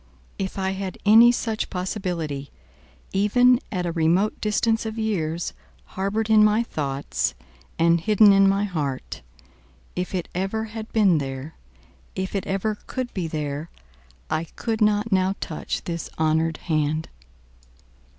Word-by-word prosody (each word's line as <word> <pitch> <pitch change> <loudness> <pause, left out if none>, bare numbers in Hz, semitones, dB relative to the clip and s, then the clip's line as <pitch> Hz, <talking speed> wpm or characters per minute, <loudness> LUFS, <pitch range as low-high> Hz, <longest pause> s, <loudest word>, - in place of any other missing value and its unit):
If 190 0 -3
I 190 0 0
had 190 -1 -5
any 225 +3 +8
such 225 -2 -2
possibility, 180 -7 -3 0.6
even 245 +5 +4
at 180 -3 -2
a 170 - -1
remote 170 +5 +1
distance 225 +1 +1
of 220 0 -5
years, 175 -7 -1 0.4
harboured 200 +3 -1
in 215 -1 +6
my 215 +2 +4
thoughts, 140 -9 -2 0.4
and 170 0 +3
hidden 210 +1 +6
in 195 0 +6
my 195 +1 +2
heart 150 -9 -3 0.7
if 180 +1 -3
it 180 - -2
ever 195 +4 -1
had 220 0 -7
been 195 -7 +4
there 135 +2 -5 0.6
if 190 0 -3
it 195 -2 -2
ever 205 +2 -1
could 255 -2 -4
be 180 -4 -2
there 150 0 -4 0.6
I 155 +1 -1
could 225 +6 -4
not 210 +1 +2
now 190 0 +2
touch 155 - -4
this 170 -1 -4
honoured 160 +1 +1
hand." 155 -1 0
190 Hz, 140 wpm, -24 LUFS, 160-215 Hz, 0.7 s, any